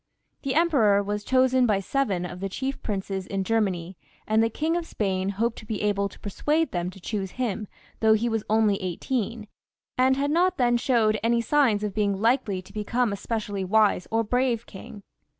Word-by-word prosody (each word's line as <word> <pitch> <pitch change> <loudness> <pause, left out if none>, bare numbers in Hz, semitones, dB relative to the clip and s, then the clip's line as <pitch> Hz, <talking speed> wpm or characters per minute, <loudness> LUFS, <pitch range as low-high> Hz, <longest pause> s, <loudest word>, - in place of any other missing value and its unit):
The 275 -2 -2
Emperor 250 -12 +4
was 205 +1 -3
chosen 260 0 +3
by 205 -3 +2
seven 195 -4 -1
of 180 - -7
the 195 +1 -3
chief 265 +7 -4
princes 195 -2 -3
in 195 -1 -2
Germany, 190 -5 -1 0.3
and 220 +1 +2
the 225 - +2
King 315 +8 -1
of 345 -1 -2
Spain 190 -2 -1
hoped 225 +4 -1
to - - -12
be 215 -2 -3
able 200 -1 +1
to - - -16
persuade 300 +10 0
them 175 0 -2
to 185 - -12
choose 195 0 -4
him, 225 -4 -2 0.3
though 220 0 +5
he 220 +2 +1
was 225 -2 -1
only 215 -2 +2
eighteen, 215 +4 -3 0.5
and 260 +1 +4
had 285 +1 0
not 360 +3 +2
then 240 -2 +3
showed 230 -4 +2
any 235 +1 +2
signs 235 -4 +2
of 210 -2 -2
being 200 -2 0
likely 225 -4 +1
to 195 - -16
become 215 +2 0
a - - -1
specially 205 -2 -3
wise 205 -1 +2
or 225 +1 +1
brave 240 0 0
king. 200 +1 -11
220 Hz, 195 wpm, -25 LUFS, 200-250 Hz, 0.5 s, though